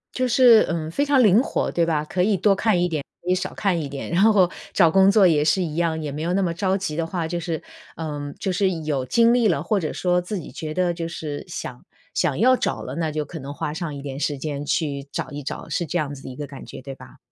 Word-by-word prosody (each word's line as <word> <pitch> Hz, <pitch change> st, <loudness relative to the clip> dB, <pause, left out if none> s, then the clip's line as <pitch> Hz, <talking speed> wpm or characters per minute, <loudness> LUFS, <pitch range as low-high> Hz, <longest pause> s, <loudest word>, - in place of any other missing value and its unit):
就 255 Hz, 0 st, 0 dB
是， 240 Hz, -3 st, +7 dB
嗯， 160 Hz, -2 st, -2 dB
非 225 Hz, -, 0 dB
常 280 Hz, -2 st, +4 dB
灵 215 Hz, +1 st, +5 dB
活， -, -, -1 dB
对 170 Hz, -, +1 dB
吧？ 155 Hz, -2 st, 0 dB
可 180 Hz, +3 st, 0 dB
以 205 Hz, 0 st, +2 dB
多 195 Hz, +2 st, +3 dB
看 200 Hz, -3 st, +2 dB
一 180 Hz, -, +2 dB
点， 155 Hz, -4 st, -3 dB, 0.2 s
可 180 Hz, -, -6 dB
以 185 Hz, -, +4 dB
少 185 Hz, -, -3 dB
看 195 Hz, -4 st, 0 dB
一 145 Hz, -, -5 dB
点。 140 Hz, 0 st, -6 dB
然 175 Hz, +3 st, +2 dB
后 205 Hz, -4 st, +5 dB, 0.2 s
找 170 Hz, -4 st, +5 dB
工 190 Hz, +3 st, +5 dB
作 200 Hz, -2 st, +6 dB
也 150 Hz, -4 st, +3 dB
是 160 Hz, +5 st, +2 dB
一 160 Hz, -4 st, -3 dB
样， 165 Hz, -1 st, 0 dB
也 150 Hz, -, -4 dB
没 145 Hz, +2 st, -5 dB
有 170 Hz, +2 st, -1 dB
那 195 Hz, +2 st, +2 dB
么 175 Hz, -3 st, 0 dB
着 190 Hz, +3 st, 0 dB
急 170 Hz, -6 st, -3 dB
的 165 Hz, +1 st, -1 dB
话， 165 Hz, -1 st, -3 dB
就 175 Hz, +2 st, -3 dB
是 165 Hz, -2 st, -3 dB, 0.4 s
呃， 145 Hz, -3 st, -5 dB
就 195 Hz, -, -2 dB
是 190 Hz, +1 st, +2 dB
有 140 Hz, -4 st, -1 dB
精 230 Hz, -, +4 dB
力 240 Hz, -3 st, +3 dB
了， 165 Hz, -6 st, +1 dB
或 190 Hz, +6 st, 0 dB
者 160 Hz, -6 st, -2 dB
说 180 Hz, -1 st, +1 dB
自 185 Hz, +3 st, -4 dB
己 160 Hz, -, -9 dB
觉 155 Hz, -1 st, -5 dB
得 180 Hz, 0 st, +1 dB
就 170 Hz, -1 st, -4 dB
是 150 Hz, -3 st, -5 dB
想 -, -, -6 dB, 0.3 s
想 135 Hz, -, 0 dB
要 255 Hz, +4 st, +5 dB
找 -, -, -2 dB
了， -, -, -6 dB
那 165 Hz, -2 st, -1 dB
就 150 Hz, 0 st, -2 dB
可 165 Hz, -, -8 dB
能 140 Hz, +1 st, -7 dB
花 150 Hz, -, -4 dB
上 165 Hz, -2 st, -4 dB
一 140 Hz, -, -7 dB
点 135 Hz, -1 st, -6 dB
时 145 Hz, 0 st, -1 dB
间， 145 Hz, 0 st, -4 dB
去 145 Hz, -2 st, -1 dB
找 -, -, -4 dB
一 145 Hz, 0 st, -6 dB
找。 -, -, -6 dB
是 175 Hz, -, -1 dB
这 175 Hz, -, -2 dB
样 145 Hz, -3 st, -2 dB
子 135 Hz, -, -12 dB
的 -, -, -7 dB
一 125 Hz, -, -11 dB
个 145 Hz, -1 st, -5 dB
感 140 Hz, -1 st, -10 dB
觉， -, -, -9 dB
对 135 Hz, 0 st, -8 dB
吧？ -, -, -15 dB
165 Hz, 300 characters per minute, -23 LUFS, 150-190 Hz, 0.4 s, 是